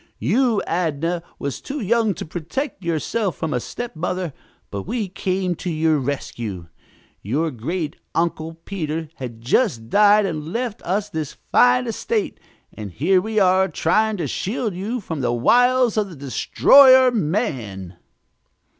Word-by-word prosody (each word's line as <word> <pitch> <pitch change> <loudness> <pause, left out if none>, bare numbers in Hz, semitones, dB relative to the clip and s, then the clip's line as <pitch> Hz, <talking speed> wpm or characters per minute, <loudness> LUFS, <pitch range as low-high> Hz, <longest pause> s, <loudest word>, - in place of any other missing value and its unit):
You, 220 - +1
Adnah, 165 0 -1 0.2
was 140 -1 -4
too 285 +2 -5
young 225 -2 +1
to - - -6
protect 180 - -5
yourself 170 +4 -1
from 160 -2 -3
a 125 - 0
stepmother, 180 - -4 0.4
but 100 -1 -5
we 230 -5 -2
came 185 0 -1
to 180 - -4
your 160 -1 +1
rescue. 115 - -5 0.5
Your 150 +10 -1
great 150 +6 -4 0.2
uncle, 165 -1 -1
Peter, 160 -4 -4
had 120 -3 -7
just 120 - 0
died 210 0 +5
and 160 -3 -4
left 235 -1 -3
us 200 +4 -1
this 155 -5 -4
fine 250 0 +5
estate, 420 - -2 0.3
and 105 -3 -7
here 180 - +2
we 220 +2 -4
are, 190 -1 +4
trying 210 +6 +1
to 170 - -2
shield 210 - -2
you 215 +7 -3
from 160 -6 -5
the 120 -2 0
wiles 245 - +3
of 210 -2 +1
the 175 - -10
destroyer, 255 - +6
man!" 135 - -2
180 Hz, 145 wpm, -21 LUFS, 150-215 Hz, 0.5 s, destroyer